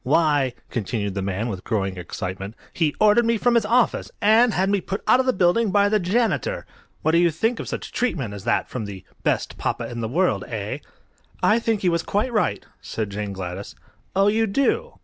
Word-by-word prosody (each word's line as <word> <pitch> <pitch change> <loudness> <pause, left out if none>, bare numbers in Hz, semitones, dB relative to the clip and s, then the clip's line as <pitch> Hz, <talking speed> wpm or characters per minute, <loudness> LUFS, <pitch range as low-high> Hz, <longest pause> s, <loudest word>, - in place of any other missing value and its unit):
"Why," 145 -3 +2 0.2
continued 105 -3 -2
the 100 - -2
man, 100 +4 -2
with 95 -5 -5
growing 95 -4 -1
excitement, 95 +3 -5 0.2
"he 160 -4 0
ordered 215 +2 +5
me 230 0 +2
from 245 +3 +2
his 230 -3 +3
office, 240 +2 +2
and 225 +3 +5
had 190 -1 +1
me 200 -1 +1
put 195 +3 -4
out 250 - +5
of 260 - +1
the - - +5
building 190 +3 +2
by 205 +1 +3
the 215 0 +3
janitor! 230 - 0 0.4
What 160 - +3
do 170 - +4
you 175 0 +4
think 225 +9 0
of - - -5
such - - -5
treatment 145 - -1
as 100 -2 -8
that - - +1
from 120 -4 -5
the 95 -2 -8 0.2
'best - - -1
papa - - -2
in 120 -1 -4
the 110 - -1
world,' 180 +8 +1
eh?" - - -4 0.6
"I 220 +2 +5
think 225 -3 0
he 185 - +3
was 170 -1 +1
quite 215 +8 -1
right," 210 - 0 0.2
said 110 -3 -4
Jane 105 0 -4
Gladys. 95 +1 -6 0.4
"Oh, 195 +1 +4
you 220 +2 +2
do? 435 - 0
175 Hz, 210 wpm, -23 LUFS, -, 0.6 s, ordered